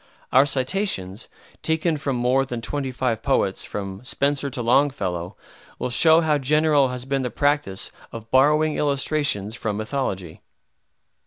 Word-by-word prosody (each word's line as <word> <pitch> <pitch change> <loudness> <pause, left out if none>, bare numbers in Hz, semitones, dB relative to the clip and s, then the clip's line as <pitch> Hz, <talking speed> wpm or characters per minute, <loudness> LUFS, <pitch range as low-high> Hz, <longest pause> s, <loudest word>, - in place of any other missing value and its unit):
Our 135 +2 +5
citations, 130 - -1 0.3
taken 160 +1 0
from 140 -3 -2
more 125 +2 +2
than 125 -3 -5
twenty 135 +3 -3
five 120 -3 -1
poets, 120 -8 0
from 100 +1 -6
Spenser 140 +2 0
to 125 -2 -4
Longfellow, 105 -9 0 0.4
will 125 - -3
show 160 +5 +5
how 155 -2 +1
general 150 0 +3
has 125 0 -5
been 135 0 -1
the 125 - -2
practice 145 -9 0 0.2
of 115 0 -10
borrowing 150 +3 +4
illustrations 140 -7 0
from 110 -3 -3
mythology. 105 - -4
130 Hz, 140 wpm, -23 LUFS, 115-145 Hz, 0.4 s, Our